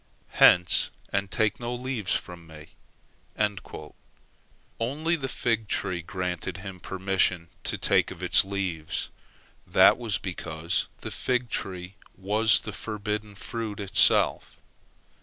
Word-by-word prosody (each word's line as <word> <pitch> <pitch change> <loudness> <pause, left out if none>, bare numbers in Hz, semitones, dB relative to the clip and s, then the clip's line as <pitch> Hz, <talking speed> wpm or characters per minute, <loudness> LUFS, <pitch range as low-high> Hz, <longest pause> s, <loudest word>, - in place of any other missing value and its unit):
Hence, 90 -2 +6 0.2
and 100 -1 0
take 110 +2 0
no 120 0 -3
leaves 125 -6 -1
from 85 -2 -6
me!" 80 -1 -13 2.1
Only 150 +9 0
the 135 -5 -4
fig 115 -4 -1
tree 90 -2 -2
granted 90 0 -4
him 95 0 -8
permission 95 -2 0 0.2
to - - -1
take - - +2
of - - -9
its - - +6
leaves. 95 -5 -3 0.6
That - - +6
was 115 -4 0
because 85 -2 -3
the - - -6
fig 125 -2 -1 0.7
was 105 +3 +3
the 105 - -7
forbidden 105 0 -4
fruit 110 0 -5
itself. 100 -2 +3
100 Hz, 115 wpm, -27 LUFS, 90-115 Hz, 2.1 s, Hence